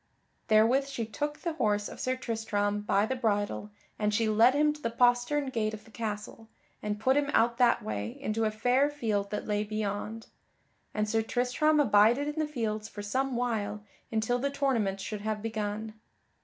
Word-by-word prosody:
Therewith 230 Hz, +6 st, +4 dB
she 255 Hz, -5 st, -3 dB
took 295 Hz, +8 st, -3 dB
the 335 Hz, -, -3 dB
horse 210 Hz, -8 st, 0 dB
of -, -, -10 dB
Sir 255 Hz, 0 st, 0 dB
Tristram 215 Hz, -4 st, -1 dB
by 205 Hz, 0 st, +2 dB
the 260 Hz, -, -2 dB
bridle 205 Hz, -3 st, -1 dB, 0.3 s
and 210 Hz, -1 st, +1 dB
she 225 Hz, +1 st, +1 dB
led 225 Hz, +5 st, +5 dB
him 300 Hz, +1 st, +3 dB
to 300 Hz, -, -13 dB
the 230 Hz, -, -1 dB
postern 245 Hz, +4 st, +2 dB
gate 215 Hz, -3 st, -1 dB
of 215 Hz, 0 st, -14 dB
the 225 Hz, -, -17 dB
castle, 220 Hz, 0 st, -5 dB, 0.3 s
and 210 Hz, 0 st, -3 dB
put 260 Hz, +5 st, +3 dB
him 285 Hz, 0 st, +1 dB
out 235 Hz, +1 st, +3 dB
that 245 Hz, -1 st, +4 dB
way 105 Hz, +1 st, -4 dB
into 220 Hz, +1 st, -1 dB
a -, -, +2 dB
fair 245 Hz, +6 st, +2 dB
field 215 Hz, -8 st, -1 dB
that 210 Hz, -, -4 dB
lay 210 Hz, 0 st, 0 dB
beyond; 215 Hz, +1 st, -3 dB, 0.7 s
and 210 Hz, 0 st, -1 dB
Sir 225 Hz, +1 st, +1 dB
Tristram 255 Hz, +7 st, +1 dB
abided 235 Hz, +2 st, +4 dB
in 295 Hz, +1 st, -3 dB
the 310 Hz, -, +1 dB
fields 220 Hz, -5 st, -2 dB
for 205 Hz, -, -7 dB
some 260 Hz, +5 st, -1 dB
while 210 Hz, -4 st, -2 dB, 0.3 s
until 225 Hz, +2 st, 0 dB
the 280 Hz, +3 st, 0 dB
tournament 250 Hz, -9 st, 0 dB
should 205 Hz, +2 st, -5 dB
have 215 Hz, 0 st, -2 dB
begun. 215 Hz, 0 st, -3 dB
225 Hz, 185 wpm, -29 LUFS, 210-255 Hz, 0.7 s, led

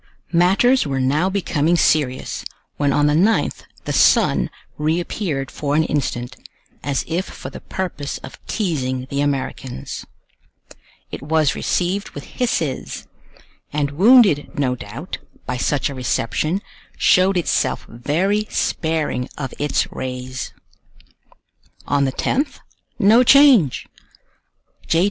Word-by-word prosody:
Matters 195 Hz, -, +4 dB
were 135 Hz, -1 st, -1 dB
now 145 Hz, +8 st, +2 dB
becoming 175 Hz, -4 st, +1 dB
serious, 145 Hz, -6 st, +1 dB, 0.3 s
when 145 Hz, -1 st, +1 dB
on 145 Hz, +2 st, +2 dB
the 150 Hz, -, +3 dB
9th 195 Hz, +9 st, +2 dB, 0.2 s
the -, -, -2 dB
sun -, -, +4 dB, 0.3 s
reappeared 155 Hz, -2 st, -1 dB
for 145 Hz, -1 st, -2 dB
an 160 Hz, -, +4 dB
instant, 130 Hz, -4 st, -2 dB, 0.4 s
as 140 Hz, -2 st, -2 dB
if 175 Hz, +4 st, -1 dB
for -, -, -9 dB
the -, -, -8 dB
purpose 170 Hz, -7 st, -4 dB
of 130 Hz, -, -11 dB
teasing 130 Hz, -, -2 dB
the 140 Hz, 0 st, 0 dB
Americans. 135 Hz, -, -3 dB, 1.1 s
It -, -, -6 dB
was 155 Hz, 0 st, +2 dB
received 190 Hz, +3 st, -1 dB
with -, -, -6 dB
hisses; 165 Hz, -, -2 dB, 0.7 s
and 145 Hz, -1 st, -1 dB
wounded, 195 Hz, -, +5 dB
no 130 Hz, -3 st, +1 dB
doubt, 125 Hz, -, -7 dB, 0.3 s
by 125 Hz, -, -3 dB
such 140 Hz, +3 st, 0 dB
a 140 Hz, -, -5 dB
reception, 140 Hz, -, -1 dB, 0.3 s
showed 185 Hz, +1 st, +4 dB
itself 175 Hz, -, 0 dB
very 185 Hz, -, 0 dB
sparing 160 Hz, -6 st, -1 dB
of 135 Hz, -4 st, -5 dB
its 145 Hz, -1 st, +1 dB
rays. 130 Hz, 0 st, -5 dB, 1.3 s
On 140 Hz, -1 st, +2 dB
the 135 Hz, -, 0 dB
10th, 280 Hz, -, -1 dB, 0.4 s
no 220 Hz, +5 st, +6 dB
change! 255 Hz, -, +5 dB, 1.0 s
J. 165 Hz, -, +3 dB
150 Hz, 120 wpm, -20 LUFS, 135-185 Hz, 1.3 s, no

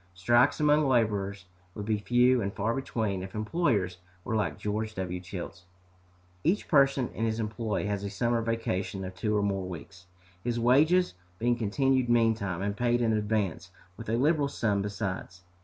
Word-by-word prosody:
Strikes 120 Hz, +7 st, +3 dB
among 150 Hz, 0 st, +4 dB
laborers 100 Hz, -6 st, 0 dB, 0.3 s
would 105 Hz, -, -5 dB
be 110 Hz, -1 st, 0 dB
few 125 Hz, +3 st, +3 dB
and 100 Hz, -1 st, -2 dB
far 110 Hz, +4 st, -1 dB
between 110 Hz, -7 st, -2 dB
if 95 Hz, +2 st, -8 dB
employers 105 Hz, -, 0 dB, 0.3 s
were 110 Hz, -, -2 dB
like 105 Hz, -2 st, -1 dB
George 110 Hz, +1 st, -3 dB
W. 90 Hz, -1 st, -3 dB
Childs. 90 Hz, -1 st, -8 dB, 0.8 s
Each 195 Hz, +5 st, +1 dB
person 135 Hz, -4 st, +3 dB
in 115 Hz, -, -3 dB
his 110 Hz, 0 st, -1 dB
employ 110 Hz, -1 st, -2 dB
has 100 Hz, -1 st, -2 dB
a 100 Hz, -, -3 dB
summer 120 Hz, +3 st, 0 dB
vacation 95 Hz, -4 st, -2 dB
of 95 Hz, -, -6 dB
two 105 Hz, +3 st, -1 dB
or 105 Hz, -, +1 dB
more 95 Hz, -2 st, -1 dB
weeks, 85 Hz, +1 st, -10 dB, 0.4 s
his 120 Hz, -1 st, -1 dB
wages 155 Hz, +10 st, +4 dB, 0.2 s
being 120 Hz, +4 st, +1 dB
continued 125 Hz, +3 st, +1 dB
meantime, 110 Hz, -6 st, +2 dB
and 100 Hz, 0 st, -1 dB
paid 120 Hz, +1 st, +1 dB
in 115 Hz, -2 st, +2 dB
advance, 105 Hz, -5 st, -1 dB, 0.3 s
with 115 Hz, +1 st, -8 dB
a -, -, 0 dB
liberal 145 Hz, +2 st, +2 dB
sum 105 Hz, -7 st, 0 dB
besides. 95 Hz, -3 st, -4 dB
110 Hz, 170 wpm, -29 LUFS, 100-120 Hz, 0.8 s, among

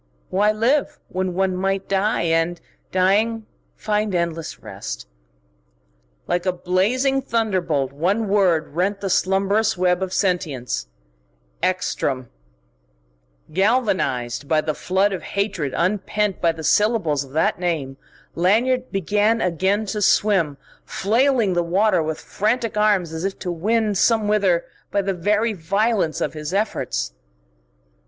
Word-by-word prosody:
Why 205 Hz, +3 st, +3 dB
live, 270 Hz, +7 st, +1 dB
when 185 Hz, -1 st, -2 dB
one 190 Hz, 0 st, +1 dB
might 195 Hz, +1 st, -1 dB
die 195 Hz, +1 st, +1 dB
and, 165 Hz, +1 st, +1 dB, 0.3 s
dying, 210 Hz, +4 st, +2 dB, 0.3 s
find 210 Hz, -2 st, -1 dB
endless 165 Hz, -2 st, -2 dB
rest? 95 Hz, -, -7 dB, 1.2 s
Like 175 Hz, +1 st, -1 dB
a -, -, +4 dB
blazing 210 Hz, +10 st, +1 dB
thunderbolt 185 Hz, -, 0 dB
one 195 Hz, +9 st, 0 dB
word 185 Hz, -6 st, +2 dB
rent 195 Hz, +5 st, 0 dB
the 195 Hz, -2 st, -2 dB
slumbrous 195 Hz, +4 st, +2 dB
web 180 Hz, 0 st, +2 dB
of 190 Hz, -1 st, -2 dB
sentience: 165 Hz, -, -1 dB, 0.7 s
Ekstrom! 140 Hz, -8 st, -1 dB, 1.2 s
Galvanised 185 Hz, -, 0 dB
by 155 Hz, +1 st, +3 dB
the 155 Hz, 0 st, -1 dB
flood 190 Hz, +5 st, +1 dB
of 185 Hz, -, -4 dB
hatred 190 Hz, -9 st, -2 dB
unpent 205 Hz, +2 st, 0 dB
by 170 Hz, -, +3 dB
the 160 Hz, -1 st, -9 dB
syllables 200 Hz, -, +2 dB
of 135 Hz, -1 st, -15 dB
that 160 Hz, +2 st, +1 dB
name, 155 Hz, -7 st, -2 dB, 0.4 s
Lanyard 245 Hz, +8 st, +1 dB
began 210 Hz, +4 st, +1 dB
again 190 Hz, +4 st, +1 dB
to 210 Hz, +1 st, -3 dB
swim, 185 Hz, -8 st, +2 dB, 0.3 s
flailing 230 Hz, 0 st, +1 dB
the 175 Hz, -, +2 dB
water 185 Hz, +2 st, +2 dB
with 155 Hz, 0 st, -3 dB
frantic 225 Hz, +2 st, -1 dB
arms 205 Hz, -6 st, +2 dB
as 160 Hz, +1 st, -4 dB
if 195 Hz, 0 st, -2 dB
to 180 Hz, -, -4 dB
win 215 Hz, +5 st, +1 dB
somewhither 205 Hz, -4 st, +2 dB, 0.2 s
by 200 Hz, -, 0 dB
the 195 Hz, 0 st, -1 dB
very 210 Hz, +5 st, +1 dB
violence 195 Hz, 0 st, 0 dB
of -, -, -1 dB
his 155 Hz, +3 st, -4 dB
efforts. 195 Hz, -, -1 dB
190 Hz, 130 wpm, -22 LUFS, 170-210 Hz, 1.2 s, a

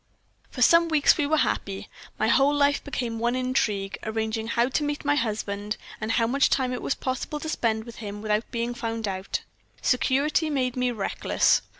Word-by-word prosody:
"For 250 Hz, -, 0 dB
some 335 Hz, +5 st, +6 dB
weeks 310 Hz, -3 st, +4 dB
we 295 Hz, -3 st, 0 dB
were 315 Hz, +1 st, +2 dB
happy. 195 Hz, -9 st, -1 dB, 0.3 s
My -, -, +1 dB
whole 275 Hz, 0 st, +4 dB
life 285 Hz, 0 st, +2 dB
became 240 Hz, -5 st, -3 dB
one 240 Hz, +2 st, +1 dB
intrigue, 215 Hz, -6 st, -1 dB
arranging 220 Hz, 0 st, -2 dB
how 235 Hz, +1 st, +2 dB
to 295 Hz, -, 0 dB
meet 290 Hz, 0 st, -3 dB
my 290 Hz, -, +3 dB
husband, 210 Hz, -5 st, -2 dB, 0.2 s
and 220 Hz, +1 st, -1 dB
how 230 Hz, -, +3 dB
much 270 Hz, +4 st, +3 dB
time 255 Hz, -2 st, +1 dB
it 250 Hz, -, -4 dB
was -, -, -1 dB
possible 260 Hz, +3 st, -3 dB
to 315 Hz, -, -6 dB
spend 220 Hz, -7 st, 0 dB
with 235 Hz, -1 st, -11 dB
him 205 Hz, -2 st, -6 dB
without 215 Hz, +1 st, 0 dB
being 235 Hz, +1 st, -2 dB
found 225 Hz, -2 st, -3 dB
out. 190 Hz, 0 st, -3 dB, 0.4 s
Security 285 Hz, +5 st, +2 dB
made 255 Hz, -4 st, 0 dB
me 250 Hz, -1 st, +1 dB
reckless. 220 Hz, -5 st, +1 dB
245 Hz, 190 wpm, -26 LUFS, 220-280 Hz, 0.4 s, some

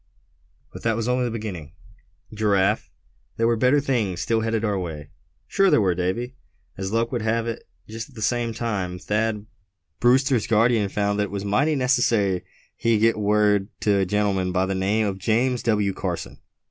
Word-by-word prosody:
"But -, -, -9 dB
that 115 Hz, -1 st, +1 dB
was 115 Hz, 0 st, -2 dB
only 125 Hz, 0 st, +1 dB
a -, -, -2 dB
beginning, 100 Hz, -9 st, -6 dB, 0.6 s
Giraffe; 105 Hz, -1 st, +1 dB, 0.5 s
there 115 Hz, -, +1 dB
were 115 Hz, 0 st, +3 dB
better 125 Hz, +5 st, +3 dB
things 115 Hz, -10 st, -1 dB
still 115 Hz, -1 st, 0 dB
headed 115 Hz, 0 st, -1 dB
our 100 Hz, -2 st, 0 dB
way." 75 Hz, -4 st, -6 dB, 0.3 s
"Sure 195 Hz, -, +2 dB
there -, -, +4 dB
were, 95 Hz, -4 st, +2 dB
Davy. 95 Hz, +9 st, -2 dB, 0.4 s
As 95 Hz, +2 st, -4 dB
luck 115 Hz, +1 st, 0 dB
would 120 Hz, -3 st, -2 dB
have 115 Hz, +1 st, 0 dB
it, 115 Hz, 0 st, -5 dB, 0.2 s
just 115 Hz, +4 st, -7 dB
at 135 Hz, -, -20 dB
that 110 Hz, -, -8 dB
same 120 Hz, +1 st, 0 dB
time 105 Hz, -6 st, -3 dB
Thad 105 Hz, +2 st, -1 dB, 0.5 s
Brewster's 125 Hz, -1 st, +3 dB
guardian 110 Hz, -2 st, +3 dB
found 100 Hz, +1 st, -1 dB
that 105 Hz, -, +2 dB
it -, -, -8 dB
was 100 Hz, 0 st, -4 dB
mighty 140 Hz, +10 st, +2 dB
necessary 120 Hz, -8 st, +2 dB, 0.3 s
he 115 Hz, -1 st, +1 dB
get 115 Hz, +1 st, +2 dB
word 105 Hz, -1 st, +2 dB
to 100 Hz, -2 st, +2 dB
a 95 Hz, -, +2 dB
gentleman 100 Hz, -2 st, 0 dB
by 90 Hz, +1 st, +1 dB
the 95 Hz, -, -2 dB
name 100 Hz, +4 st, +1 dB
of 95 Hz, -2 st, -3 dB
James 120 Hz, +5 st, +1 dB
W. 105 Hz, -4 st, +1 dB
Carson. -, -, -5 dB
110 Hz, 185 wpm, -23 LUFS, 100-115 Hz, 0.6 s, there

